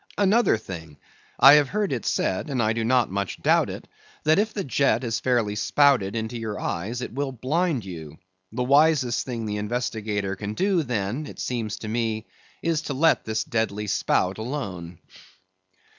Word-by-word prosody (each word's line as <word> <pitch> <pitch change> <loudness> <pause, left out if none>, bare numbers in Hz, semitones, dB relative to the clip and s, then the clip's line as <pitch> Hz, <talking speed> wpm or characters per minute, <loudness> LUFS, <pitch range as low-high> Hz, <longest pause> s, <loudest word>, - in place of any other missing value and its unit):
Another 205 - +3
thing; 80 -8 -9 0.4
I 135 - +10
have 150 -2 +5
heard 205 -5 -1
it 120 - -3
said, 95 +11 -1
and 135 -3 -2
I 110 -1 +2
do 115 0 -2
not 120 -2 +2
much 100 0 -3
doubt - - +3
it, - - -8 0.4
that 155 +4 +4
if 215 +1 +1
the 205 -2 -3
jet 130 -3 +1
is 115 -2 -1
fairly 120 -5 +1
spouted 125 -3 +3
into 115 +1 -3
your 110 -2 -4
eyes, 115 +9 -3
it - - -6
will 140 +1 -2
blind 135 - -1
you. 80 -5 -8 0.3
The 125 +3 -2
wisest 140 -3 +3
thing 115 -3 -4
the 105 -1 -3
investigator 105 -3 -2
can 105 +1 -5
do 190 - +2
then, 120 +2 -2
it - - -10
seems 115 -4 -3
to 110 - -7
me, 110 -1 -2 0.4
is 165 -2 +1
to 140 - -4
let 160 +4 +3
this 110 0 -1
deadly 110 -2 -2
spout 95 -1 0
alone. 100 - -5
115 Hz, 175 wpm, -25 LUFS, 105-140 Hz, 0.4 s, I